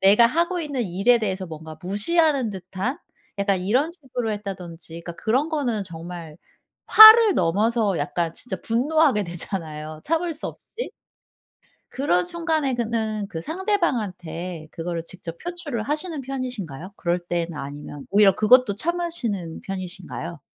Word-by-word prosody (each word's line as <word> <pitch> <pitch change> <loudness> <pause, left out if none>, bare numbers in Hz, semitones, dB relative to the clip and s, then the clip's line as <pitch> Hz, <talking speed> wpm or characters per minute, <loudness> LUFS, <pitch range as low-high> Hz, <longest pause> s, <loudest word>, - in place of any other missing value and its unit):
내가 205 +5 +7
하고 340 +7 0
있는 285 -6 -2
일에 200 +6 +3
대해서 190 -3 -2
뭔가 160 -1 -9
무시하는 260 - +2
듯한 190 - -4 0.4
약간 200 -2 +1
이런 250 - +1
식으로 255 -9 -4
했다든지 175 -5 -7
그니까 170 - -5
그런 260 +8 +1
거는 255 -9 -1
정말 170 -2 -8 0.5
화를 435 -1 +10
넘어서 205 +4 +1
약간 165 +3 -2
진짜 250 - -4
분노하게 260 -2 +2
되잖아요, 155 -3 -5
참을 330 +2 0
수 300 - -5
없이. - - -13 1.2
그런 180 -10 +1
순간에 315 - -1
그는 220 -3 -2
그 165 - -5
상대방한테 185 - -2
그거를 165 0 -4
직접 170 -1 -9
표출을 345 -10 -4
하시는 305 +4 -2
편이신가요? 225 - -5
그럴 175 +1 -1
때나 170 -3 -3
아니면 145 0 -8
오히려 200 -1 +6
그것도 215 0 +5
참으시는 290 - -2
편이신가요? 180 -3 -6
205 Hz, 325 characters per minute, -23 LUFS, 175-275 Hz, 1.2 s, 화를